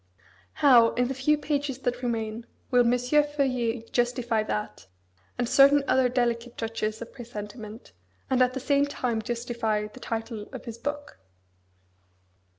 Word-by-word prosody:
How, 235 -4 +7
in 245 0 +1
the - - -1
few 270 +3 +2
pages 290 -3 -2
that 245 -2 -2
remain, 230 -1 -3 0.2
will 245 -1 +5
M. 250 - +3
Feuillet 250 -4 0
justify 240 -2 +1
that, 105 - -4 0.5
and 245 - 0
certain 280 +3 +6
other 260 -1 +3
delicate 240 -1 -1
touches 225 0 -3
of 235 - -14
presentiment, 220 -2 -9 0.4
and 255 -1 +2
at 255 +1 +3
the - - -2
same 280 +2 +2
time 245 -5 -2
justify 235 -2 -2
the 210 - -11
title 225 -2 -5
of - - -8
his 230 -1 -7
book? 290 - -5
240 Hz, 145 wpm, -27 LUFS, 225-265 Hz, 0.5 s, How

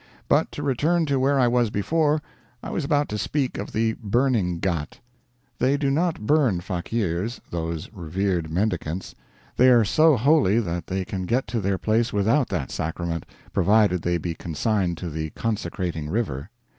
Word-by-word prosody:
But - - +2
to 145 - -5
return 155 +5 +1
to 140 -3 +1
where 135 +1 +2
I 125 - +4
was 120 -1 +2
before; 150 +8 +1 0.4
I - - -5
was 165 - -2
about 145 0 +1
to 105 - -3
speak 135 -3 -1
of 100 - -5
the 110 0 +1
burning 110 -5 +1
ghat. 85 -5 -2 0.6
They 135 +2 +2
do 140 -1 0
not 160 -5 0
burn 135 - +3
fakeers 95 +3 -2
those 85 -2 -3
revered 90 -2 -2
mendicants. 90 -2 -2 0.4
They 130 +1 +6
are 120 -3 +6
so 155 +6 +4
holy 130 -4 +4
that 85 -5 -3
they 95 0 -2
can 95 -1 -4
get 125 +3 +1
to 115 -2 -1
their 95 0 0
place 110 +4 +1
without 115 +7 +2
that - - -3
sacrament, 85 0 -3 0.3
provided 100 -2 +3
they 85 0 0
be 85 +1 -3
consigned 85 +2 -1
to 85 -1 -5
the 80 +1 -3
consecrating 85 -7 -3
river. 85 - -2
105 Hz, 170 wpm, -24 LUFS, 85-130 Hz, 0.6 s, They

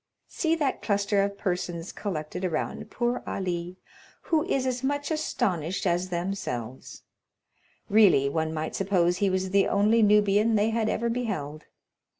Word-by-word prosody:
See 325 -1 0
that 295 -5 -1
cluster 200 -1 +1
of 200 0 -2
persons 175 -2 -3
collected 180 -2 -5
around 165 -4 -3
poor 240 +1 -1
Ali, 180 -1 -3 0.5
who 315 -2 +1
is 275 -8 0
as 255 0 -2
much 285 +3 -1
astonished 195 - -1
as 180 +1 0
themselves; 170 - -5 0.8
really 200 -10 +5
one 160 +2 -1
might 155 0 -3
suppose 180 -3 +1
he 200 +1 +2
was 185 0 -1
the 200 0 +4
only 215 +3 +3
Nubian 210 +1 +4
they 215 +2 +2
had 225 -1 0
ever 235 - -1
beheld. 195 -12 -3
195 Hz, 145 wpm, -27 LUFS, 175-225 Hz, 0.8 s, really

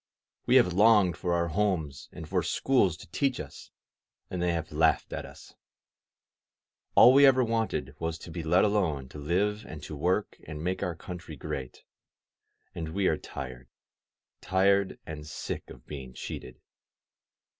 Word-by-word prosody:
We - - +4
have 90 - +5
longed 105 -2 +5
for 90 -1 -1
our 85 0 0
homes 80 -7 -1
and 80 -3 -9
for 90 +1 +1
schools 95 +1 +2
to - - -14
teach 135 -3 0
us, 70 -2 -9 0.6
and 90 - -3
they 90 0 +2
have 80 -2 -3
laughed 80 +1 +2
at - - -5
us. - - -14 1.4
All 125 - +9
we 140 - +7
have 135 -2 +8
ever 130 - +3
wanted 115 - -1
was 80 0 -2
to 85 - -11
be 85 - -4
let 85 +4 +3
alone 85 -11 0
to 75 - -9
live 100 +8 0
and 75 -5 -9
to 75 - -6
work 90 +8 0
and 75 0 -6
make 90 +2 -2
our 90 -3 -2
country 85 -1 -8
great, 65 -1 -6 0.9
and 80 -1 -5
we 100 -1 +1
are - - +3
tired 65 -2 -8 0.4
— - - -62
^tired 95 +1 +2
and 75 -1 -7
sick - - -5
of 60 -1 -13
being 65 -4 -8
cheated. - - -7
85 Hz, 165 wpm, -29 LUFS, 75-100 Hz, 1.4 s, All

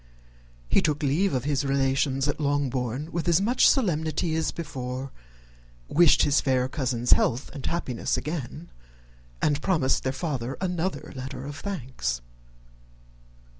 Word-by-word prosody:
He - - +3
took 150 0 0
leave 165 +8 +2
of 125 - -1
his 145 0 0
relations 135 0 +1
at 145 - -1
Longbourn 140 -1 -1
with 170 +1 -3
as 170 0 +5
much 235 +6 +4
solemnity 160 - +1
as 160 - 0
before; 130 -4 -5 0.8
wished 170 -1 +5
his 145 -1 +3
fair 130 -2 +1
cousins 125 -3 -1
health 125 +3 +3
and 140 - -7
happiness 130 -9 -1
again, 155 +1 -5 0.7
and 145 -1 +2
promised 155 -8 +2
their 130 - -1
father 135 -3 -3
another 180 0 -2
letter 130 0 -6
of 145 0 -6
thanks. 130 - -3
140 Hz, 130 wpm, -26 LUFS, 130-160 Hz, 0.8 s, as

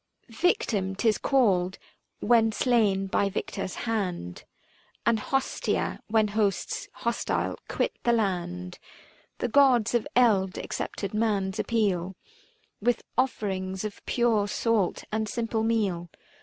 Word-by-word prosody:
360 275 +11 +1
Victim 200 - -1
'tis 215 +1 +2
called 190 -9 +2 0.4
when 225 -2 +4
slain 215 -5 +2
by 200 +1 +1
Victor's 195 -1 -4
hand, 185 - -3 0.6
And 230 -1 +3
Hostia, 270 +5 -1
when 215 -1 +2
hosts 205 -2 -1
hostile 235 0 -2
quit - - 0
the 240 - +2
land. 180 -4 -1 0.6
The - - -1
Gods 245 -3 +4
of 240 -2 +1
eld 205 -7 +3
accepted 200 -1 -4
man's 205 -3 0
appeal 195 -5 0 0.7
With 240 +2 +1
offerings 190 -7 -1
of 210 - -7
pure 230 -4 +2
salt 215 -2 0
and 220 0 -1
simple 230 -1 -1
meal. 205 -7 0
215 Hz, 115 wpm, -27 LUFS, 190-230 Hz, 0.7 s, when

